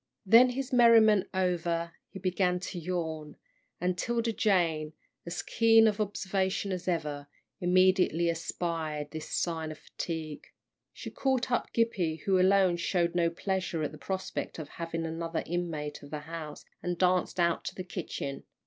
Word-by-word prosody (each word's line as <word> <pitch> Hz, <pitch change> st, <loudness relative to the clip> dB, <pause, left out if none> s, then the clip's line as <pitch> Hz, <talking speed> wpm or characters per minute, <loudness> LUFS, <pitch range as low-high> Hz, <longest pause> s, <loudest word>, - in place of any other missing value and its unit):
Then 230 Hz, +6 st, +7 dB
his 265 Hz, +1 st, -4 dB
merriment 225 Hz, -4 st, +6 dB
over, 170 Hz, -2 st, 0 dB, 0.2 s
he -, -, -9 dB
began 185 Hz, -1 st, +1 dB
to 180 Hz, -1 st, -5 dB
yawn, 160 Hz, -3 st, -4 dB, 0.4 s
and 180 Hz, +1 st, 0 dB
'Tilda 230 Hz, +4 st, -1 dB
Jane, 165 Hz, -8 st, +1 dB, 0.3 s
as 170 Hz, -, -4 dB
keen 225 Hz, 0 st, +5 dB
of 215 Hz, 0 st, 0 dB
observation 195 Hz, -1 st, -1 dB
as 185 Hz, -1 st, -4 dB
ever, 150 Hz, -5 st, -2 dB, 0.3 s
immediately 180 Hz, -2 st, +3 dB
espied 165 Hz, -2 st, -3 dB
this 155 Hz, -1 st, -6 dB
sign 160 Hz, -2 st, -2 dB
of 155 Hz, -, -8 dB
fatigue. 160 Hz, -3 st, -6 dB, 0.4 s
She -, -, -8 dB
caught 260 Hz, -2 st, 0 dB
up 240 Hz, -, 0 dB
Gippie, 185 Hz, -9 st, 0 dB
who 195 Hz, -3 st, +3 dB
alone 185 Hz, -1 st, +4 dB
showed 170 Hz, 0 st, 0 dB
no 170 Hz, -1 st, +2 dB
pleasure 185 Hz, -1 st, -2 dB
at 150 Hz, -, -2 dB
the 155 Hz, -, -12 dB
prospect 190 Hz, +6 st, -4 dB
of 155 Hz, -3 st, -7 dB
having 165 Hz, -1 st, -4 dB
another 165 Hz, 0 st, -3 dB
inmate 165 Hz, -4 st, -3 dB
of 145 Hz, -, -12 dB
the 150 Hz, 0 st, -5 dB
house, 155 Hz, -1 st, -8 dB, 0.2 s
and 175 Hz, -1 st, -2 dB
danced 180 Hz, 0 st, +1 dB
out 170 Hz, -1 st, +2 dB
to -, -, -4 dB
the 185 Hz, -, -5 dB
kitchen. 170 Hz, -6 st, -5 dB
175 Hz, 155 wpm, -30 LUFS, 160-190 Hz, 0.4 s, Then